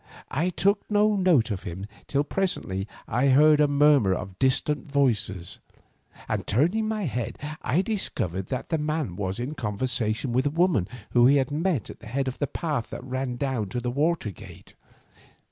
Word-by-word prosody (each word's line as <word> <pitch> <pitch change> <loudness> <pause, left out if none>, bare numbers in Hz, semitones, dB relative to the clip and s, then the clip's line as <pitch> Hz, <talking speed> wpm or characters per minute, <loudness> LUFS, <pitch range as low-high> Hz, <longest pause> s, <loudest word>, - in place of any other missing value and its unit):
I 165 +6 +1
took 200 +3 +2
no 210 0 +3
note 170 - +3
of 95 - -3
him 90 +3 -6 0.2
till 140 0 +1
presently 145 - -2 0.2
I 125 +5 +1
heard 150 +3 +6
a 150 - +5
murmur 145 -9 +4
of 95 0 -7
distant 135 +2 +1
voices, 105 -10 0 0.7
and - - -2
turning 175 - +2
my 215 -1 -2
head 125 -7 -3 0.2
I 160 +10 +1
discovered 95 - -2
that 130 - -4
the 160 - 0
man 150 - -2
was 95 0 -3
in 125 +5 -3
conversation 115 0 -1
with 130 +3 +2
a - - +2
woman 160 - +2 0.2
whom 120 0 +6
he 140 - +5
had 135 -1 +1
met 155 - -1
at - - -13
the - - -12
head 135 +4 -1
of 130 - -4
the 145 - 0
path 145 -8 -3
that - - -7
ran 130 -1 -3
down 120 -6 -2
to 120 - -3
the 120 0 -2
water 150 -4 0
gate. 90 - -13
135 Hz, 180 wpm, -26 LUFS, 110-155 Hz, 0.7 s, heard